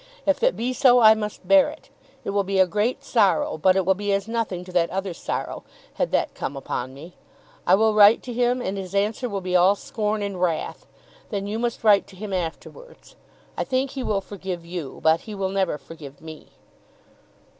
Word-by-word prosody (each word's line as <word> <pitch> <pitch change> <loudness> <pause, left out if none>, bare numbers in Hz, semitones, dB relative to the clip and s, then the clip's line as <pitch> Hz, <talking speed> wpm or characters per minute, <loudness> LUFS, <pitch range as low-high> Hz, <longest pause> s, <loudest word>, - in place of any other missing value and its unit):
If 290 -1 +1
it - - +3
be 245 +2 -1
so 250 0 +5
I 220 -2 +8
must 210 -3 -6
bear 195 0 +6
it. - - -13 0.3
It - - -3
will 200 0 +1
be 195 0 -2
a 190 - +6
great 210 +6 -1
sorrow, 205 -8 +1
but 185 +3 +4
it 190 -2 +1
will 190 - +4
be 205 +1 -3
as 195 +1 -1
nothing 225 -6 -2
to 180 - -11
that 175 -2 +2
other 195 -1 -3
sorrow, - - -5 0.3
had - - -1
that - - 0
come 140 - -5
upon 130 -1 -5
me. 165 +6 -11 0.5
I - - +7
will 220 +2 +3
write 210 +1 +6
to 245 - -6
him, 245 +1 +1
and 195 +1 -3
his 190 0 -7
answer 215 +5 0
will 200 -2 -3
be 185 0 -2
all 185 +3 +5
scorn 210 0 -3
and 195 -3 -4
wrath. 170 -3 -2 0.4
Then 200 -2 -3
you 210 +2 -3
must 235 -1 -3
write 205 -2 +5
to 190 - -15
him 200 +1 -6
afterwards. 335 - -7 0.4
I - - -1
think 265 0 -1
he 270 - -5
will 205 -5 -1
forgive 190 -3 -7
you, 170 -5 -7
but 160 +1 +4
he 210 - -5
will 195 -1 -2
never 190 -5 0
forgive 145 -1 -12
me." 160 -1 -11
195 Hz, 210 wpm, -23 LUFS, 180-220 Hz, 0.5 s, I